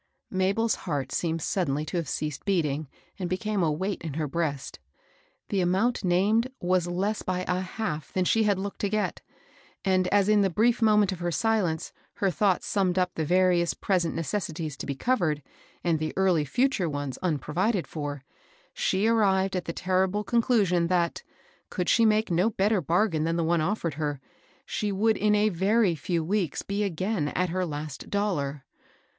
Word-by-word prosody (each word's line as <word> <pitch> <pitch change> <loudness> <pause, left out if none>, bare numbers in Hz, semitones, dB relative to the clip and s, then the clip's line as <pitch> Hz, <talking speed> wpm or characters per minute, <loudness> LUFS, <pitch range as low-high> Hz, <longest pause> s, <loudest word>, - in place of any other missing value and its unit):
Mabel's 200 +4 +1 0.2
heart 135 -3 -2
seemed 165 0 -1
suddenly 155 -6 -1
to 165 - -3
have 165 -3 -2
ceased 150 -2 -3
beating, 155 -7 0 0.3
and 180 -2 -2
became 205 +2 -1
a 160 -3 +2
weight 190 +6 -2
in 160 -4 -5
her 155 -1 -1
breast. 145 -2 -3 0.7
The 195 - +1
amomit 195 +7 +1
named 205 +7 +2
was 180 -1 +1
less 195 +5 -1
by 185 0 -2
a 180 0 +1
half 185 -6 -4
than 185 -1 0
she 225 - +3
had 205 -3 +2
looked 200 +1 -5
to 205 - 0
get, 215 0 -1 0.6
and 185 -1 +2
as 200 0 +3
in 210 -1 +4
the 195 - +3
brief 230 +6 +2
moment 210 -3 +4
of 185 - -5
her 175 0 -1
silence 195 -5 0 0.2
her 195 -2 0
thoughts 190 +1 +1
summed 190 -3 +1
up 180 -1 +1
the 160 - -2
various 175 +1 +2
present 180 -4 0
necessities 165 -2 -3
to - - -6
be 140 - -2
covered, 160 - 0 0.4
and 165 -3 +1
the 155 0 -3
early 180 -5 +3
fii 255 - +2
ture 180 -10 -1
ones 145 -3 -4
unprovided 180 - 0
for, 145 -3 -5 0.5
she 190 +3 0
arrived 195 -4 +2
at 180 - -2
the - - -3
terrible 190 +3 0
conclusion 205 -7 +2
that, 175 - 0 0.5
could 180 -2 -2
she 230 - +4
make 215 -2 +2
no 180 +6 +3
better 205 -1 +1
bargain 165 +1 +1
than 165 +1 0
the 170 - 0
one 165 0 +2
offered 170 -2 -1
her, 145 -2 -3 0.5
she 210 -1 -2
would 215 +3 +2
in 210 0 +2
a 210 +1 +3
very 200 +2 +2
few 165 +1 -2
weeks 180 -2 -1
be 200 +1 -2
again 185 -2 -1
at 180 +4 -1
her 180 +1 -1
last 150 -2 -6
dollar. 150 -10 -1
185 Hz, 180 wpm, -27 LUFS, 160-205 Hz, 0.7 s, in